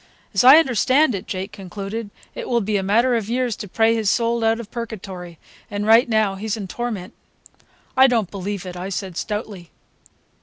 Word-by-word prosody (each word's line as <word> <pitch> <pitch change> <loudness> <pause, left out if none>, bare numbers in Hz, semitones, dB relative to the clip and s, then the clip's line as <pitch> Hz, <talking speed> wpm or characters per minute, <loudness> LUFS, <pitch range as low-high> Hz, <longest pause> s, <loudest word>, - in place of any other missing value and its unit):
"As 195 - +3
I 265 +4 +10
understand 265 - +3
it," 195 0 -5
Jake 190 +2 -4
concluded, 200 +3 -6 0.2
"it - - -6
will 240 - +2
be 210 +1 -1
a 200 - +2
matter 230 +6 +2
of 220 -2 -2
years 245 -2 0
to 205 - -7
pray 225 +4 +2
his 220 -3 0
soul 235 0 +1
out 225 +1 +2
of 230 -2 -9
Purgatory, 190 -7 -7 0.3
and 205 -1 -3
right 225 +3 +5
now 215 -3 +2
he's 210 +3 -3
in 200 -3 -5
torment." 215 -3 -5 0.8
"I 265 0 +7
don't 225 -7 0
believe 200 0 -5
it," 180 -1 -7
I 180 +2 -5
said 190 -2 -4
stoutly. 205 -3 -5
215 Hz, 190 wpm, -21 LUFS, 195-235 Hz, 0.8 s, I